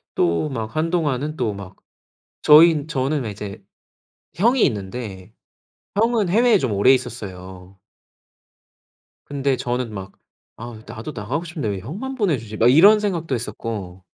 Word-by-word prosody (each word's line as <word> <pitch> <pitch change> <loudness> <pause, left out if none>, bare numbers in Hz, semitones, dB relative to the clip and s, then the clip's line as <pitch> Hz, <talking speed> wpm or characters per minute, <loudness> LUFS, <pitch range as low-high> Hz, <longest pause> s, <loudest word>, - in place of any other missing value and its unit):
또 85 - +1
막 115 +1 -5
한동안은 155 -3 -1
또 115 -6 -1
막 100 -1 -10 0.7
저희는 155 0 +6
저는 140 0 -1
왜 110 - -4
이제 100 -1 -8 0.7
형이 235 +7 +3
있는데 105 - -5 0.6
형은 225 -3 +2
해외에 230 +3 +4
좀 130 - -1
오래 100 +6 +5
있었어요. 95 -6 -5 1.5
근데 140 -2 -1
저는 120 -2 -3
막 95 -1 -7 0.4
'아 115 -1 -9
나도 115 +8 -7
나가고 125 +10 -3
싶은데 155 -9 -4
왜 100 -2 -2
형만 205 - -6
보내주지?' 135 - -1
막 115 +3 +4
이런 200 +10 +7
생각도 170 -9 -2
했었고 105 -6 -5
125 Hz, 265 characters per minute, -21 LUFS, 105-160 Hz, 1.5 s, 이런